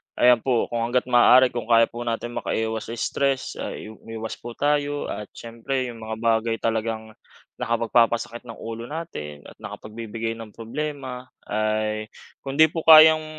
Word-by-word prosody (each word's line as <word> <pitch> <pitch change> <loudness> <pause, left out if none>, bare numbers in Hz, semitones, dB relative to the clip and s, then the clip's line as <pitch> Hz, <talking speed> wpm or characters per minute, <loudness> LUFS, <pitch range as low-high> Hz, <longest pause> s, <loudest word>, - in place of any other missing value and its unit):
Ayan 125 -1 +5
po, 120 0 +1
kung 120 - -1
hangga’t 125 +1 0
maaari, 125 +1 +6
kung 120 -2 -5
kaya 115 -1 +5
po 120 - -8
natin 115 +1 -2
makaiwas 110 0 -2
sa - - -4
stress, 135 +3 -1
ah, - - -4
i 110 - -9
umiwas 110 0 -8
po 120 0 -8
tayo, 145 0 0
at 105 - -6
siyempre 125 +2 -4
yung 115 - -12
mga 110 0 -5
bagay 115 0 +2
talagang 110 -1 -2 0.5
nakapagpapasakit 115 +1 +1
ng 115 - -8
ulo 115 +1 -7
natin 75 - -7
at - - -13
nakapagbibigay 115 +1 -6
ng 110 -2 -10
problema 130 +1 -5 0.2
ay 110 0 -1 0.4
kung 135 0 -5
hindi 160 - +9
po 165 - -3
kayang 155 0 +9
115 Hz, 160 wpm, -24 LUFS, 110-130 Hz, 0.5 s, hindi